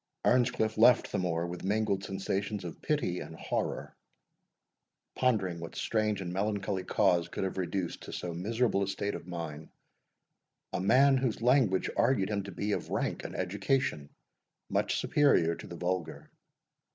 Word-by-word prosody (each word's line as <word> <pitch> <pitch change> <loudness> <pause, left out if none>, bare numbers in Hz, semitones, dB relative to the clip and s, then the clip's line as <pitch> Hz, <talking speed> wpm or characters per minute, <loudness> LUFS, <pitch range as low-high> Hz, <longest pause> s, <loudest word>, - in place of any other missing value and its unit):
Earnscliff 120 -3 +2
left 120 +2 +6
the - - 0
moor 85 -2 0
with 85 0 -6
mingled 100 0 0
sensations 95 +1 -2
of 85 - -7
pity 145 - 0
and 80 - -8
horror, - - -3 1.2
pondering 100 -9 +1
what 85 0 -8
strange 110 -2 0
and 90 -2 -4
melancholy 100 -1 -1
cause 90 -3 +2
could 90 - -4
have 95 0 -2
reduced 90 -1 -2
to - - -8
so 90 -1 -4
miserable 110 +4 0
a 100 - 0
state 100 +1 -2
of - - -7
mind, 80 -3 -6 1.0
a - - 0
man 135 +8 +5
whose 125 -3 -1
language 120 -7 +3
argued 115 -5 +2
him 100 -1 0
to 100 - -7
be 105 +4 -2
of - - -2
rank - - -1
and - - -6
education 95 - -1 0.6
much - - +1
superior 140 - +3
to - - -9
the 85 - -8
vulgar. 85 -5 -3
95 Hz, 155 wpm, -30 LUFS, 90-110 Hz, 1.2 s, left